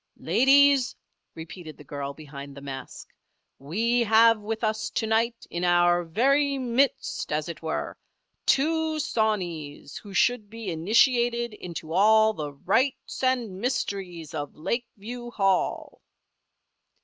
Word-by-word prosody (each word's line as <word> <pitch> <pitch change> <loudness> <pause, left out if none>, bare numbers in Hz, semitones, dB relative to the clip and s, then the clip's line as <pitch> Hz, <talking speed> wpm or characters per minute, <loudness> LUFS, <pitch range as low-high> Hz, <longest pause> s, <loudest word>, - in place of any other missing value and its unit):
"Ladies!" 270 - +4 0.4
repeated 160 0 -9
the 150 - -13
girl 140 0 -5
behind 140 -1 -10
the - - -9
mask. 135 -2 -8 0.5
"We 225 - 0
have 225 0 +5
with 220 +2 -4
us 215 0 -1
to - - -2
night, 230 +2 0
in 170 +1 -3
our 175 0 +3
very 275 - +2
midst, 260 +1 0
as 150 0 -1
it 170 - -7
were, 160 -1 -3 0.5
two 315 +2 +2
sawneys 175 - -2
who 205 - -11
should 245 -3 +2
be 225 -3 -6
initiated 235 +6 +2
into 170 -5 -7
all 220 +3 +5
the 150 -7 -5
rites 255 - -1
and 245 -7 0
mysteries 195 - -3
of 145 -2 -5
Lakeview 235 +5 -5
Hall." 195 -5 -1
215 Hz, 125 wpm, -26 LUFS, 165-240 Hz, 0.5 s, have